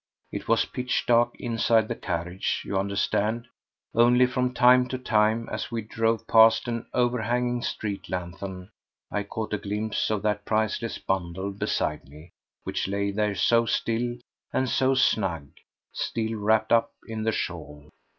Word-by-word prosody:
It - - -6
was - - +3
pitch 125 0 -2
dark 120 0 +3
inside 115 -2 +2
the 120 - -2
carriage, 90 -2 -3
you - - -4
understand; 100 +4 0 0.5
only 120 +2 +5
from 125 0 0
time 125 0 +5
to 130 - -3
time, 110 -1 +1
as - - -3
we 115 -2 -3
drove 115 +1 0
past 115 0 +5
an 115 -1 -3
overhanging 120 0 0
street 100 -4 -4
lanthorn, 90 +1 -6 0.4
I 105 - 0
caught 105 +2 -5
a 105 - 0
glimpse 105 +2 -2
of 105 -2 -1
that 105 -1 0
priceless 110 +1 -1
bundle 95 +1 -2
beside 75 -7 -2
me, 75 +4 -14 0.3
which - - -2
lay 100 +1 -1
there 105 0 0
so 115 +3 +3
still 120 +2 0 0.4
and 130 - 0
so 130 +1 +2
snug, 90 - +1 0.4
still 110 -1 -2
wrapped 110 +1 +1
up 115 0 +3
in 110 -1 -4
the 110 +1 +1
shawl. 75 -7 -5
110 Hz, 150 wpm, -26 LUFS, 100-120 Hz, 0.5 s, only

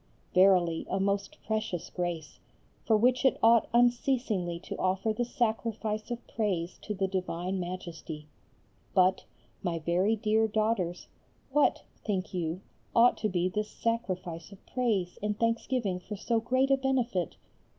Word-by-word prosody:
verily, 180 -3 +4
a 190 - 0
most 200 0 -1
precious 215 -6 -2
grace, 175 -4 -4 0.5
for 220 - +5
which 250 +3 +3
it 265 - +4
ought 230 0 +6
unceasingly 240 -7 +2
to 175 - -7
offer 190 +4 +1
the 240 - -1
sacrifice 225 -3 -1
of 240 - -2
praise 185 -6 -2
to 210 - -4
the 195 0 0
divine 185 0 -2
Majesty. 170 -4 -6 0.7
But, 185 0 +4 0.4
my 175 -3 -1
very 175 +7 +2
dear 220 +1 +2
daughters, 215 -5 0 0.5
what, 295 +2 +3 0.2
think 195 -3 -2
you, 170 0 -2 0.3
ought 235 +1 +6
to 215 - 0
be 180 -1 +1
this 210 +3 -2
sacrifice 185 -7 -3
of 200 - -15
praise 215 -8 -1
in 210 0 -1
thanksgiving 230 -3 0
for 210 +4 -7
so 225 +3 0
great 255 +4 +1
a 270 - +5
benefit? 250 - 0
205 Hz, 140 wpm, -30 LUFS, 180-230 Hz, 0.7 s, ought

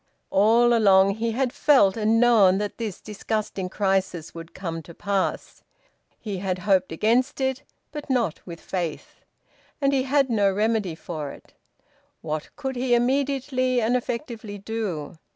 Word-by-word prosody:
All 230 +4 +4
along 195 -4 +5
he 230 0 -1
had 255 +1 -1
felt 260 -10 +4
and 220 0 +2
known 220 -6 +5
that 205 +3 -4
this 215 -5 -4
disgusting 210 -3 -4
crisis 190 -4 -1
would 165 0 -10
come 165 -3 -5
to 165 +1 -13
pass. 200 -2 -2 0.6
He 200 -4 -5
had 185 -1 -2
hoped 185 -1 +1
against 235 - +1
it, 265 0 -1 0.3
but 295 -1 -8
not 235 -10 0
with 170 -2 -9
faith. 175 -4 -5 0.6
And 280 -1 +2
he 270 - +2
had 275 +1 +2
no 205 -5 +2
remedy 210 -3 0
for 155 -3 -6
it. - - -14 0.7
What 155 -1 -4
could 265 -2 -4
he 245 0 +2
immediately 255 0 +1
and 235 +2 +1
effectively 235 -4 -4
do? 195 -7 -5
215 Hz, 150 wpm, -24 LUFS, 190-245 Hz, 0.7 s, along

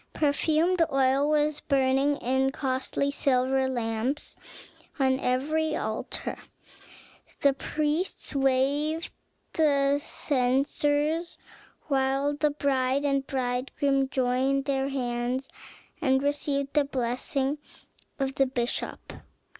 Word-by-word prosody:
Perfumed 315 +4 +2
oil 270 +2 +3
was 300 0 +1
burning 270 +1 +2
in 265 +1 +1
costly 270 +1 -1
silver 265 -1 +1
lamps 240 +3 -2 0.6
on 265 -2 +2
every 305 +5 0
altar. - - -3 1.0
The 280 -1 +5
priests 305 +6 -2
waved 280 +4 +1 0.4
the 285 -2 +3
censers, 290 +5 0 0.5
while 275 0 +1
the 300 +1 +2
bride 275 -1 0
and 275 -1 0
bridegroom 270 +1 0
joined 265 +1 +1
their 270 -1 0
hands 250 0 -2 0.5
and 265 -3 +2
received 285 -1 -1
the 295 - +4
blessing 265 +2 -1 0.6
of 270 -1 -1
the 270 -1 +2
bishop. 245 -2 -3
275 Hz, 95 wpm, -27 LUFS, 260-290 Hz, 1.0 s, The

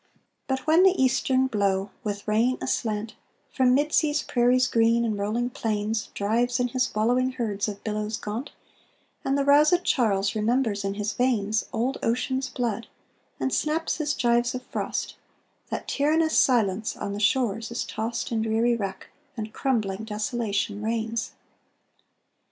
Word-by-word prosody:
But 265 -1 -2
when 320 +3 +5
the 380 0 +4
eastern 265 0 +2
blow, 200 -4 0
with 205 -1 -4
rain 230 +4 +2
aslant, 220 -3 -2 0.4
From 255 -1 +4
mid 295 +2 +1
sea's 300 -2 +2
prairies 250 +1 +3
green 230 0 +3
and 220 -2 -1
rolling 220 +5 -1
plains 215 -1 -2
Drives 240 +5 +1
in 245 0 +1
his 255 0 0
wallowing 250 +4 +2
herds 215 -5 -2
of 205 -1 -6
billows 215 0 -2
gaunt, 220 +7 -5 0.7
And 270 +1 +1
the 280 - +1
roused 300 +5 +5
Charles 200 -6 +1
remembers 220 -1 0
in 195 0 -2
his 210 0 -2
veins 220 -4 0
Old 245 +4 -1
Ocean's 260 +3 -1
blood 230 -3 -2 0.5
and 265 - -1
snaps 315 +2 0
his 300 -2 -1
gyves 240 +1 +2
of 255 - -5
frost, - - -4 0.5
That - - -4
tyrannous 315 +3 +2
silence 220 -5 +2
on 200 - -4
the 205 - -4
shores 225 0 +1
is 235 - -3
tost 230 +3 -3
In 225 -1 0
dreary 225 +2 +2
wreck, 195 -4 -5 0.3
and 215 0 -5
crumbling 220 -6 -1
desolation 210 -2 -2
reigns. 225 +1 -2
230 Hz, 150 wpm, -26 LUFS, 215-260 Hz, 0.7 s, when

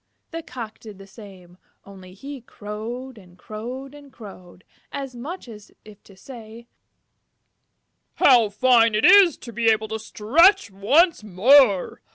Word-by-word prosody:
The 330 0 -6
Cock 235 -8 -10
did 215 -3 -13
the 195 - -14
same, 190 -4 -16 0.3
only 190 -2 -15
he 275 +5 -10
crowed 230 +3 -9
and 180 -2 -20
crowed 245 +8 -9
and 290 -1 -16
crowed, 185 -5 -15 0.3
as 270 -3 -7
much 290 +7 -9
as 210 -3 -14 0.3
to 195 - -19
say, 230 0 -13 1.5
"How 240 -5 +4
fine 230 +1 +2
it 215 - +1
is 375 -2 +6
to 235 - -12
be 230 +2 -2
able 220 -1 +1
to 220 0 -5
stretch 250 - +2
once 280 - +1
more! 210 +1 +2
225 Hz, 140 wpm, -21 LUFS, 205-265 Hz, 1.5 s, is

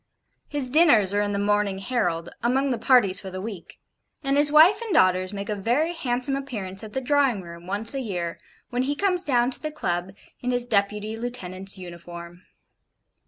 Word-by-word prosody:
His 280 -4 -2
dinners 250 - +5
are 205 - +2
in 205 0 -1
the 200 - -1
MORNING 205 -1 +1
HERALD, 190 -6 -2
among 265 +3 +1
the 240 - -2
parties 220 -7 +4
for 195 - -7
the 185 0 -6
week; 195 -4 -8 0.4
and 275 0 +1
his 290 0 +3
wife 320 +9 +6
and 460 -3 -5
daughters 185 - +3
make 200 0 -5
a 215 - -1
very 245 - 0
handsome 265 -4 -1
appearance 215 -8 -5
at 215 -1 -9
the 265 - -2
Drawing 265 -6 +1
Room, 170 0 -11
once 205 +5 +4
a 270 - -2
year, 175 -7 -4 0.3
when 245 0 0
he 280 +3 -1
comes 365 0 +1
down 245 -4 +2
to 245 - -8
the 310 - -3
Club 185 - -3 0.3
in 250 - -2
his 245 -1 +1
Deputy 210 -1 0
Lieutenant's 195 -5 -3
uniform. 175 -1 -10
220 Hz, 190 wpm, -24 LUFS, 190-270 Hz, 0.4 s, wife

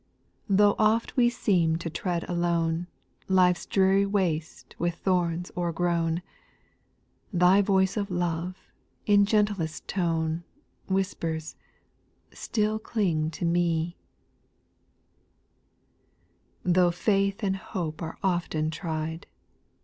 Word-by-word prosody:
Though 205 +1 +5
oft 220 +2 +2
we 240 -2 +4
seem 175 -8 +1
to 170 +1 -4
tread 175 0 -3
alone 170 -1 0 0.4
Life's 180 -2 +3
dreary 195 +1 +3
waste 175 -6 -2
with 175 0 0
thorns 175 -2 -1
o'ergrown, 170 -1 0 1.1
Thy 180 +1 +5
voice 190 0 +2
of 200 -1 -1
love, 175 0 -2 0.5
in 205 -1 +5
gentlest 205 -7 0
tone, 165 -2 -1 0.4
Whispers, 165 -5 -2 0.4
" - - -42 0.3
Still 215 -1 -1
cling 180 -9 0
to 160 +2 -4
me 170 0 +1 2.7
I". - - 0
6. - - +5
Though 180 -1 +5
faith 195 +2 0
and 195 -1 +1
hope 170 -5 -5
are 160 -1 -5
often 170 -4 0
tried. 160 0 -4
175 Hz, 105 wpm, -27 LUFS, 165-195 Hz, 2.7 s, Though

